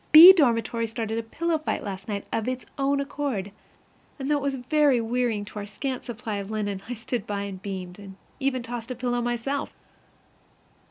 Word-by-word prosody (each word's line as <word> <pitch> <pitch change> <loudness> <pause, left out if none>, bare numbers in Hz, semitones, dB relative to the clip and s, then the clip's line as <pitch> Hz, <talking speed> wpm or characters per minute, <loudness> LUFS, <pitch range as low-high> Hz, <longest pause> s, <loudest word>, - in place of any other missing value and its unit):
B 335 +5 +13
dormitory 230 -7 +2
started 225 0 -2
a - - -1
pillow 320 +8 -1
fight 310 - -2
last 190 -2 -6
night 205 -2 -3
of 225 - 0
its 255 -3 -3
own 275 +1 +2
accord; 275 -8 -2 0.7
and 270 - -4
though 295 - +4
it - - -3
was 275 -1 0
very 270 +1 +3
wearing 230 -2 0
to 210 +1 -7
our 205 - -6
scant 255 +5 -4
supply 225 -3 -4
of 200 0 -5
linen, 205 -3 -2
I 245 - -2
stood 230 -1 -4
by 200 -1 -2
and 195 -2 -6
beamed, 185 -2 -6
and 195 -1 -10 0.2
even 265 -2 0
tossed 235 0 -5
a 255 - -3
pillow 245 0 -1
myself. 240 +4 -2
235 Hz, 195 wpm, -26 LUFS, 205-270 Hz, 0.7 s, B